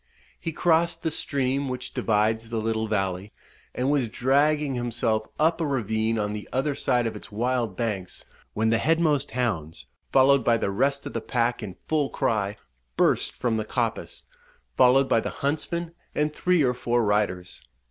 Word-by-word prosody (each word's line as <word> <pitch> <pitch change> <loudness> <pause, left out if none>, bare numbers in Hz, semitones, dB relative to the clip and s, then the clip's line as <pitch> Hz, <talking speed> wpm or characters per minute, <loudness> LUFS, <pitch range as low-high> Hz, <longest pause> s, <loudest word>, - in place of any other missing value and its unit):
He 165 - -3
crossed 165 0 +1
the 160 - 0
stream 140 -2 -1
which 125 0 -5
divides 110 +1 +1
the 115 - -3
little 110 0 -1
valley, 95 -1 -2 0.4
and 130 +3 +1
was 135 -6 +1
dragging 140 +4 +2
himself 120 -3 -1
up 165 +2 +2
a 160 - 0
ravine 110 -4 0
on 105 -1 -1
the 105 -1 -7
other 135 +3 0
side 125 -3 +1
of 115 - -2
its - - -10
wild 115 -2 -1
banks, 100 -6 -3 0.3
when 110 +1 +2
the 115 - +3
headmost 155 -1 +2
hounds, 110 -10 -3 0.3
followed 135 0 +5
by 115 0 +3
the 100 - -1
rest 140 +7 0
of - - -6
the - - -2
pack 120 -1 0
in 95 -4 -6
full 150 -3 +1
cry, 105 -2 -1 0.4
burst - - +2
from 120 -3 0
the 110 - -1
coppice, 115 -1 -3 0.5
followed 130 - +5
by - - +3
the - - -3
huntsman 165 +4 -3 0.2
and 150 0 0
three 180 -1 +2
or 125 -2 +2
four 120 -1 0
riders. 100 -4 -1
120 Hz, 170 wpm, -25 LUFS, 110-140 Hz, 0.5 s, followed